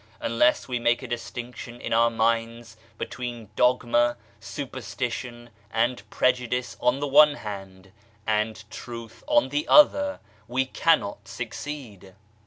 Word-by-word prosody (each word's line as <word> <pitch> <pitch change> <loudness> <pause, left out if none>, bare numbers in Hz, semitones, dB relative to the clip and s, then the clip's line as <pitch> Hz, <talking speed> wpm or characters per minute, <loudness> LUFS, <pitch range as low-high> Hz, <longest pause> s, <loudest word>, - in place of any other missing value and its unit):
Unless 115 +2 +2
we 125 -2 -2
make 120 0 +2
a - - -5
distinction 120 0 -6
in - - -3
our 115 +1 +5
minds 115 0 -1 0.2
between 120 -4 -6
dogma, 120 -1 +3 0.2
superstition 120 -1 -5 0.2
and 115 -1 -1
prejudice 125 0 0
on 125 +2 +2
the 145 - -1
one 145 +1 +7
hand, 95 -4 -8 0.3
and 110 0 -1
Truth 115 -1 -9
on 295 0 +3
the 300 +2 -1
other, 290 -1 +5 0.3
we 130 +3 0
cannot 130 -9 +1
succeed. 115 -6 -7
120 Hz, 120 wpm, -26 LUFS, 115-125 Hz, 0.3 s, one